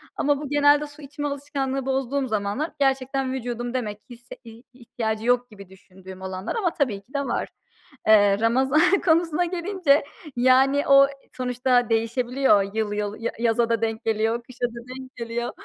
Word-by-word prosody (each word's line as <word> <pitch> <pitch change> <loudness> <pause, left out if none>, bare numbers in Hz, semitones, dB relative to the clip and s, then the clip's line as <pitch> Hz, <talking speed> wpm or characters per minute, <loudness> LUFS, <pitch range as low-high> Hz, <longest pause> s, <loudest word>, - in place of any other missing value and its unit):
ama 290 0 +1
bu 290 - -6
genelde 290 0 +4
su 290 +1 -14
içme 290 +1 -5
alışkanlığı 275 -2 -3
bozduğum 270 0 -1
zamanlar 215 +7 -2
gerçekten 270 -1 0
vücudum 240 -1 -4
demek 215 -5 -3
ki 250 - -11
hisse 240 +1 -12
hi 230 +1 -13
ihtiyacı 225 -3 -4
yok 245 0 +2
gibi 200 -3 -13
düşündüğüm 190 0 -14
olanlar 190 +2 -5
ama 375 -7 0
tabii 230 -9 -1
ki 220 +7 -27
de 280 - 0
var. - - -2 0.6
Eee 205 -2 +5
Ramazan 265 +6 +3 0.2
konusuna 330 0 +2
gelince, 350 -4 +1 0.3
yani, 260 +3 +3
o 275 0 +7 0.3
sonuçta 250 -1 +1
değişebiliyor 230 -2 +1
yıl 215 -2 -1
yıl, 210 0 -3
ya 230 - -2
yaza 230 0 +1
da 230 -1 0
denk 225 0 -2
geliyor, 225 +1 0
kışa 245 0 -4
da 235 -1 -6
denk 260 0 -10
geliyor. 235 0 -4
245 Hz, 165 wpm, -24 LUFS, 225-275 Hz, 0.6 s, o